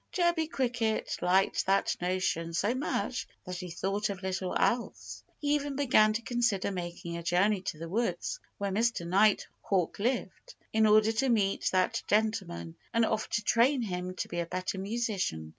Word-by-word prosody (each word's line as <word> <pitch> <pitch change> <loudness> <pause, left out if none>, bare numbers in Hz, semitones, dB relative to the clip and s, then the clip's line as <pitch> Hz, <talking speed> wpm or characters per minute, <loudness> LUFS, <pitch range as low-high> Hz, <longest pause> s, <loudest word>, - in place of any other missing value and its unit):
Chirpy 345 -3 +1
Cricket 240 -6 -1
liked 185 +2 +2
that 195 +1 +2
notion 175 -2 -1
so 205 +7 +1
much 265 +4 -2 0.2
that 180 -1 -5
he 180 0 -6
thought 195 +5 -1
of 195 -1 -5
little 190 -1 -2
else. 235 0 -1
He 290 -1 0
even 290 -1 -1
began 250 -6 +4
to 230 +2 -3
consider 235 -5 0
making 175 -2 -5
a - - -5
journey 185 +4 +2
to 180 - -4
the 165 +2 -6
woods 235 - -1 0.2
where 200 -1 -2
Mr. 225 -3 +1
Nighthawk 195 -1 +1
lived, 255 - -2 0.2
in 220 0 +4
order 215 +1 +5
to 255 +4 0
meet 205 -4 +2
that 185 -1 +1
gentleman 205 - -1
and 230 0 +3
offer 220 -1 -1
to 210 - -1
train 250 +2 +3
him 180 -2 -4
to - - -3
be 175 - -4
a 170 - -2
better 185 +2 -3
musician. 195 - -2
200 Hz, 170 wpm, -30 LUFS, 180-235 Hz, 0.2 s, order